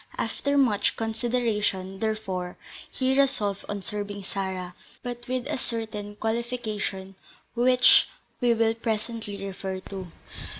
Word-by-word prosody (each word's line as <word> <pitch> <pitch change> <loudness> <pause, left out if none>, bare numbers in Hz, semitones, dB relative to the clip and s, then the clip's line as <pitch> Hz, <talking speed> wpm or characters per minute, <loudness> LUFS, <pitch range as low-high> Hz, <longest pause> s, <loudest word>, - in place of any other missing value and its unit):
After 285 0 0
much 225 -7 +3
consideration, 220 -4 0
therefore, 195 -5 -2 0.3
he 260 0 +1
resolved 205 -8 +2
on 205 -1 -3
serving 205 -1 -4
Sarah, 185 -2 -3 0.3
but 240 0 -5
with 255 0 -1
a 295 -1 -1
certain 220 -3 -3
qualification, 220 -4 -2 0.4
which 250 +1 +7 0.3
we 240 -2 +4
will 225 0 +3
presently 220 -3 -3
refer 190 -1 -4
to. 190 -2 -5
220 Hz, 115 wpm, -27 LUFS, 195-240 Hz, 0.4 s, which